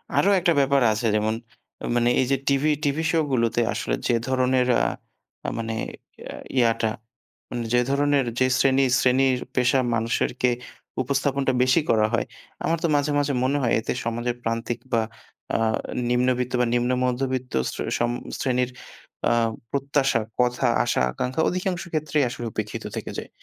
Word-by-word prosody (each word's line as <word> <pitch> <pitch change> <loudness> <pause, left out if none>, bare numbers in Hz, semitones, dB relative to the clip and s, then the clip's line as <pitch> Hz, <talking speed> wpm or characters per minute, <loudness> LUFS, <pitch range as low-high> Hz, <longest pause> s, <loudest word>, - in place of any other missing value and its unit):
আরো 200 - +4
একটা 170 0 +2
ব্যাপার 140 0 +3
আছে 115 +3 -3
যেমন 110 +1 +1 0.6
মানে 120 0 +3
এইযে 135 +2 +2
টিভি 140 +2 +3
টিভি 150 +2 0
শোগুলোতে 130 -7 +1
আসলে - - -1
যে - - +2
ধরনের 130 -1 +2
আ - - +2 0.7
মানে 115 0 -3 0.5
এ - - -7 0.2
ইয়াটা 115 -2 +3 0.6
মানে 120 -1 -3
যে 120 - +5
ধরণের, 140 -1 +2
যে 130 - +4
শ্রেণী 135 0 +4 0.2
শ্রেণীর 130 0 +3 0.2
পেশা 125 +1 +3 0.2
মানুষেরকে 115 +2 0 0.5
উপস্থাপনটা 140 0 0
বেশি 130 +5 +4
করা 110 -1 +4
হয়, 115 - +1 0.4
আমার 165 +1 +1
তো 170 - +3
মাঝে, 145 +1 +1
মাঝে 145 0 0
মনে 140 +3 +1
হয়, 120 -3 +1
এতে - - -2
সমাজের 120 +1 -1
প্রান্তিক 115 +1 -2
বা 115 - +4 0.5
আ - - +3 0.5
নিম্নবিত্ত 125 0 +1
বা 125 - +3
নিম্ন 120 +1 +1
মধ্যবিত্ত 130 0 -2 0.2
শ্রে - - -4 0.2
সম 120 - +1 0.3
শ্রেণীর 125 -1 +1 0.6
আ - - +2 0.4
প্রত্যাশা, 140 -3 +1 0.2
কথা, 125 +1 +2 0.2
আশা-আকাঙ্খা 120 - 0
অধিকাংশ 180 -1 -2
ক্ষেত্রেই 155 -1 +1
আসলে 120 0 -6
উপেক্ষিত 105 -1 -4
থেকে - - -5
যায়। - - -6
125 Hz, 145 wpm, -24 LUFS, 120-140 Hz, 0.7 s, যে